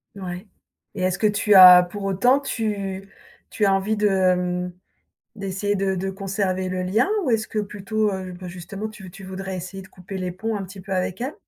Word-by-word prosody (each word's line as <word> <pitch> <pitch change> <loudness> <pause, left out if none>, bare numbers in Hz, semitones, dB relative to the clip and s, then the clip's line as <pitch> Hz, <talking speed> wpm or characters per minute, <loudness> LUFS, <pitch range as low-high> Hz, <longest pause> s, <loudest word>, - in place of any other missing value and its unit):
Ouais 185 0 -7 0.5
et 190 - -4
est-ce 185 -1 +1
que 215 - 0
tu 210 0 +3
as 180 -1 +11
pour 195 +3 -6
autant 220 +8 +3
tu 200 -7 -3 0.4
tu 215 - 0
as 195 - +4
envie 200 +3 0
de 210 0 +3
hem, 180 -2 +1 0.6
d'essayer 200 0 -2
de 195 -1 0
de 190 +1 -2
conserver 190 -1 -2
le 185 0 -2
lien 215 - +1 0.2
ou - - 0
est-ce 220 -1 0
que 215 - -2
plutôt, 210 +1 -1
heu, 185 -1 -5
bah, 180 +1 -9
justement, 185 +4 -6
tu 210 -4 -11
tu 195 +1 -11
voudrais 190 0 -5
essayer 185 +2 -7
de 190 - -16
couper 185 +1 -9
les 180 -1 -3
ponts 220 +5 -3
un 200 - -3
petit 190 +1 -10
peu 190 +1 -6
avec 185 0 -2
elle? 260 +5 -3
195 Hz, 210 wpm, -23 LUFS, 185-205 Hz, 0.6 s, as